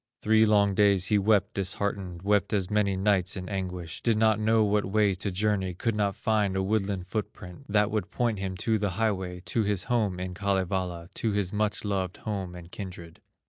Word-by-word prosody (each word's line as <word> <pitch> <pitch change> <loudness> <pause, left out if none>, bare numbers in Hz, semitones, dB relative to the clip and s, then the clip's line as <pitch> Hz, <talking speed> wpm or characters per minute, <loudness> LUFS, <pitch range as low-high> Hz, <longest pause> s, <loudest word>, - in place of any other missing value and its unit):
Three 110 +1 +5
long 100 -2 +4
days 100 -2 +4
he 105 - +4
wept 105 0 +2
disheartened 95 -2 -3
Wept 100 +1 +2
as 100 -1 0
many 105 -2 +2
nights 95 -1 +1
in 90 -1 -6
anguish, 90 -4 -4
Did 115 -2 +2
not 110 -1 +3
know 110 +1 +3
what 105 0 +2
way 100 0 +2
to 95 +2 -3
journey, 95 -1 0
Could 115 +5 -1
not 100 -2 0
find 105 -3 0
a 95 - +1
woodland 100 -2 -1
foot 105 +3 -3
print, 95 +7 -12
That 105 0 +2
would 105 -4 -2
point 115 -5 -1
him 95 -1 -4
to 110 -2 +2
the 100 0 0
highway, 95 -5 -1
To 90 +6 -1
his 100 -3 0
home 105 -7 0
in 90 0 -4
Kalevala, 95 -3 -1
To 110 -2 -1
his 100 -2 -1
much 105 0 -1
loved 95 -3 -2
home 95 -4 -4
and 85 0 -11
kindred. 90 -5 -9
100 Hz, 200 wpm, -27 LUFS, 95-105 Hz, -, Three